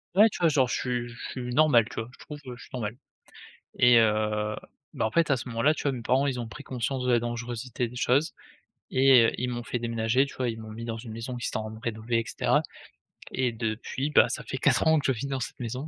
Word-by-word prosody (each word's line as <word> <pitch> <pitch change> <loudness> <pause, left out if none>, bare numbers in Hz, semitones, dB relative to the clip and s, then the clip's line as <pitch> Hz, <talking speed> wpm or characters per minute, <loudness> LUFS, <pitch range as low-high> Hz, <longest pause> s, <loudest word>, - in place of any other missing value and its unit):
Ouais, 215 +3 +7
tu - - -7
vois, 170 -2 +4
genre, 135 -4 +3
je - - -3
suis 120 -1 -2
je 120 - -11 0.2
suis 125 -1 -5
normal, 145 -7 +5
tu - - -10
vois, 115 +2 -5
je - - -17
trouve, 150 -1 -8
heu, 125 - -6
je - - -14
suis - - -15
normal. 110 -2 -3 0.8
Et 120 -1 +7
heu, 105 -1 +1 0.4
bah, 120 - -1
en - - -2
fait, 165 +3 +2
à 140 - +4
ce 125 +1 -6
moment-là, 125 +7 +2
tu - - -6
vois, 140 - +1
mes 120 -2 -5
parents, 130 +5 +2
ils 125 -3 -1
ont 115 - -5
pris 145 - -10
conscience 130 0 -3
de 125 - +1
la 120 - +5
dangerosité 120 +1 -3
des 125 - -12
choses 140 +6 +2 0.6
et 130 -2 +7
heu, - - +1
ils 125 0 -1
m'ont 120 -1 -4
fait 125 - -3
déménager, 115 +2 +1
tu 140 - -11
vois, 125 -2 -1
ils 115 0 -5
m'ont 110 -1 -9
mis 115 +2 -7
dans 115 -1 -4
une 115 0 -9
maison 115 +3 -5
qu'ils 120 - -3
étaient - - -2
en 110 - -3
train - - -9
de 110 - -11
rénover 115 +1 -1
et 115 - -3
cetera. - - +2 0.7
Et 125 -2 0
depuis, 115 +5 -3
bah, - - +5
ça - - -3
fait 130 - -5
4 130 +2 +3
ans 160 -1 +5
que - - -5
je 130 -4 +1
vis 140 - -4
dans 135 -1 -2
cette 125 - -6
maison 125 +5 -4
120 Hz, 275 wpm, -27 LUFS, 115-130 Hz, 0.8 s, Ouais